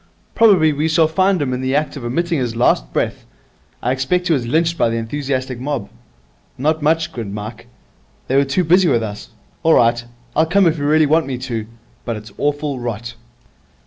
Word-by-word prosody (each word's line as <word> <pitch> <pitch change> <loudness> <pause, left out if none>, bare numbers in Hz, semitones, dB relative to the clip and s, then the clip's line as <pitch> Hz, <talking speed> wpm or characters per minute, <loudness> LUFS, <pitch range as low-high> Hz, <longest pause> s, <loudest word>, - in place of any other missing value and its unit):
Probably 185 -9 +5
we 150 +2 0
shall 160 0 +3
find 185 +3 +2
him 135 -4 -1
in 125 - -3
the 130 +1 -1
act 150 +1 0
of 140 - -7
emitting 165 +7 -1
his 120 -3 -2
last - - +2
breath. - - -2 0.6
I 125 - +1
expect 175 +8 0
he - - +4
was 125 -5 -1
lynched 165 +6 +1
by 115 - +2
the 115 - -2
enthusiastic 130 +1 -3
mob.' 135 -6 -4 0.7
'Not 155 +4 0
much,' 160 +2 +1
grinned 110 -8 -6
Mike. 110 +2 -8 0.6
'They 130 - 0
were 140 - +5
too 140 +7 0
busy 175 +2 +4
with 115 -4 +2
us. 105 -1 -7 0.3
All 160 0 +4
right, 120 0 +3 0.3
I'll 160 +1 +3
come 195 +3 +3
if 165 -2 +2
you 145 - -2
really 155 +1 +4
want 155 +1 +2
me 130 -2 -3
to, 120 -4 -4 0.4
but 115 - -3
it's 105 +2 -10
awful 145 -2 -1
rot.' 120 0 -5
140 Hz, 200 wpm, -19 LUFS, 120-160 Hz, 0.7 s, Probably